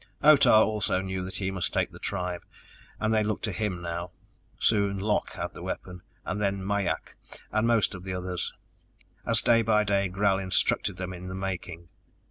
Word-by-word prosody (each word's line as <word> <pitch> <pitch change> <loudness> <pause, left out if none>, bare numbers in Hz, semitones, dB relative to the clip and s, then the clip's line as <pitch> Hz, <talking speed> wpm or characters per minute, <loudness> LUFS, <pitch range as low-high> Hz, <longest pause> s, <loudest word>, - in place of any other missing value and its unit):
Otah 140 -7 +7
also 105 -3 0
knew 95 -1 -3
that 95 - -6
he 95 -1 -1
must 95 -2 -1
take - - +1
the - - -12
tribe, 90 -1 -3 0.6
and 110 0 +1
they 110 -1 +3
looked 105 0 -2
to 110 - 0
him 95 -2 -2
now. 85 +1 -4 0.5
Soon 100 -2 +2
Lok 105 +2 0
had - - -4
the - - -10
weapon, 90 -1 -5 0.2
then 100 -2 -1
Mai 100 -1 0
ak - - -6 0.4
and 110 +1 +2
most 115 -3 +3
of 90 -1 -8
the 95 -1 -4
others, 90 -1 -3 0.8
as - - +3
day 115 -1 +5
by 105 -1 +3
day 100 -1 +1
Gral 95 +1 +1
instructed 95 0 +1
them 90 0 -4
in 90 0 -8
the 95 - -5
making. 90 -3 -5
95 Hz, 185 wpm, -28 LUFS, 90-105 Hz, 0.8 s, Otah